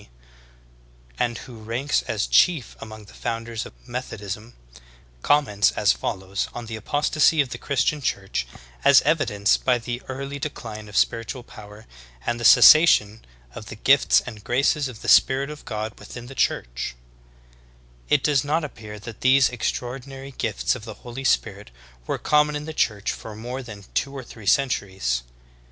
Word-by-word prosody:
D., - - -20 1.1
and 120 -1 0
who 120 -3 -11
ranks 120 +7 -1
as 105 -2 -1
chief 160 -9 +3
among 110 -1 -10
the - - -16
founders 115 0 -4
of - - -20
Methodism, 115 -2 -6 0.7
comments 105 - +3
as - - +3
follows 95 +10 -3
on 120 - -6
the 110 0 -6
apostasy 145 +7 +2
of 140 -3 +2
the - - -6
Christian 140 +2 0
Church 95 - -2 0.4
as 140 - +7
evidenced 120 -10 +1
by 125 -1 +3
the 120 +1 -5
early 140 +2 -5
decline 110 -7 -6
of 105 - -5
spiritual 115 +2 0
power 105 -1 -13 0.4
and 120 - -1
the - - -5
cessation 110 -11 +7 0.3
of - - -9
the - - -8
gifts - - +4
and 110 -5 -10
graces 140 +4 +1
of 120 -4 -10
the - - -6
Spirit 135 +2 +4
of 150 - -11
God 110 0 -5
within 120 -1 -10
the 130 - -10
Church: - - -1 1.1
"It 145 -2 +3
does 145 -4 +2
not 155 +3 0
appear 110 -7 -8
that 110 +1 -10
these 130 0 +5
extraordinary 135 +3 -5
gifts 115 -5 -1
of 125 - -7
the 110 -2 -8
Holy 125 +2 -7
Spirit'* - - 0 0.4
were - - -1
common 150 0 +2
in 150 0 -4
the 160 - -6
Church 105 -8 0
for 110 -2 -8
more 120 +4 -6
than 105 -5 -10
t\\o 135 +7 -3
or 135 -2 -6
three 110 -4 -12
centuries. 95 - +1
120 Hz, 165 wpm, -23 LUFS, 105-135 Hz, 1.1 s, as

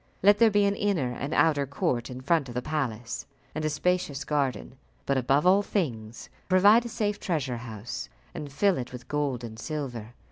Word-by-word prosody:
Let 205 +1 +6
there 230 -1 +7
be 205 -1 +3
an 200 - +2
inner 190 -12 0
and 140 +4 -4
outer 145 -3 +3
court 130 -3 -1
in 130 0 -7
front 140 -1 +1
of 120 - -8
the 125 - 0
palace, 125 -7 -3 0.3
and 155 - -3
a 155 - +1
spacious 155 -2 0
garden; 140 -4 -1 0.3
but 140 - +1
above 135 +4 +2
all 190 +2 +6
things, 120 - -3 0.2
provide 205 +5 +6
a - - -4
safe 210 -3 -1
treasure 140 -9 -1
house, 115 -1 -6 0.2
and 145 -2 -6
fill 195 +3 +2
it 125 - -5
with 125 -1 -9
gold 140 -4 -1
and 110 -1 -8
silver. 125 -6 -5
145 Hz, 190 wpm, -27 LUFS, 125-180 Hz, 0.3 s, there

